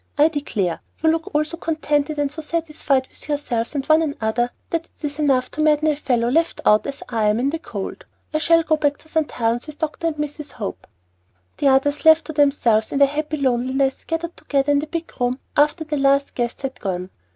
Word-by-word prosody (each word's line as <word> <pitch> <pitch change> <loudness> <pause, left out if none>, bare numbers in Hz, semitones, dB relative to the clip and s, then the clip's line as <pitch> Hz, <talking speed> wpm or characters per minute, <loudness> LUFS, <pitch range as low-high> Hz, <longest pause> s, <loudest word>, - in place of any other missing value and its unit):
"I 300 +2 +6
declare, 215 - -2 0.2
you 320 - +5
all - - +6 0.2
look 300 0 +2
so 335 +2 -3
contented 305 -2 -1
and 290 -1 0
so 315 +2 -6
satisfied 305 -4 0
with - - -13
yourselves 270 -4 -2
and 270 -1 -1
one 310 +1 +5
another, 240 -6 0 0.2
that 330 0 -1
it's 295 -1 -5
enough 270 -4 +2
to 310 - -3
madden 305 0 +3
a 300 - +2
fellow, 245 -5 0
left 330 +6 +1
out, 210 +3 +4
as 280 - -6
I 225 -3 0
am, 210 +2 +2
in 270 +3 +1
the 325 - -3
cold! 200 - -6 0.3
I 310 - +2
shall 330 +1 +4
go 315 0 +2
back 290 -1 +1
to - - -17
St. 315 -1 0
Helen's 235 +3 -1
with 300 -1 -9
Dr. 315 +1 -2
and 325 - -1
Mrs. 300 0 -5
Hope." 210 -4 -6 0.7
The 285 - +3
others, 275 +2 +3
left 320 0 +6
to 315 - -6
themselves 275 -7 +2
in - - -1
their 280 0 +6
happy 305 +1 -2
loneliness, 265 0 0
gathered 330 +1 -3
together 280 0 0
in 285 - +4
the 305 - -4
big 335 +1 -5
room 245 +1 +1 0.2
after 300 +3 +3
the 305 -1 -3
last 275 0 +3
guest 240 +2 -3
had 265 -1 -4
gone. 185 -1 -3
290 Hz, 220 wpm, -21 LUFS, 255-310 Hz, 0.7 s, I